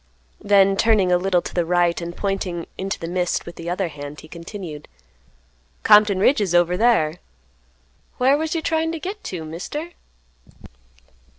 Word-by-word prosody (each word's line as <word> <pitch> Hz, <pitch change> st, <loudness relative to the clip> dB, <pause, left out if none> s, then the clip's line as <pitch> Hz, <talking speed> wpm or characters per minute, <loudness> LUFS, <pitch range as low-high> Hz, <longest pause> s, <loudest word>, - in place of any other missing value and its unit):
Then 195 Hz, -1 st, +4 dB
turning 205 Hz, -5 st, +3 dB
a 180 Hz, -, +5 dB
little 180 Hz, -1 st, +1 dB
to -, -, -7 dB
the 175 Hz, -, +1 dB
right 175 Hz, 0 st, +1 dB
and 170 Hz, 0 st, -6 dB
pointing 190 Hz, -4 st, -2 dB
into 195 Hz, +1 st, -3 dB
the 165 Hz, -, -6 dB
mist 180 Hz, 0 st, -1 dB
with 170 Hz, -, -9 dB
the 170 Hz, 0 st, -6 dB
other 180 Hz, +1 st, -1 dB
hand, 145 Hz, 0 st, -9 dB
he 155 Hz, -, -13 dB
continued, 170 Hz, -2 st, -8 dB, 1.0 s
"Compton 210 Hz, -2 st, +6 dB
Ridge 220 Hz, +5 st, +3 dB
is 185 Hz, -4 st, 0 dB
over 175 Hz, 0 st, +3 dB
thar. 180 Hz, -7 st, +2 dB, 1.0 s
Whar 260 Hz, +3 st, +4 dB
was 320 Hz, +3 st, -2 dB
you 325 Hz, -, -2 dB
tryin' 325 Hz, 0 st, 0 dB
to 330 Hz, -, -4 dB
git 395 Hz, +5 st, -6 dB
to, 170 Hz, -4 st, -5 dB
Mister?" 245 Hz, -, -6 dB
185 Hz, 165 wpm, -22 LUFS, 170-220 Hz, 1.0 s, Compton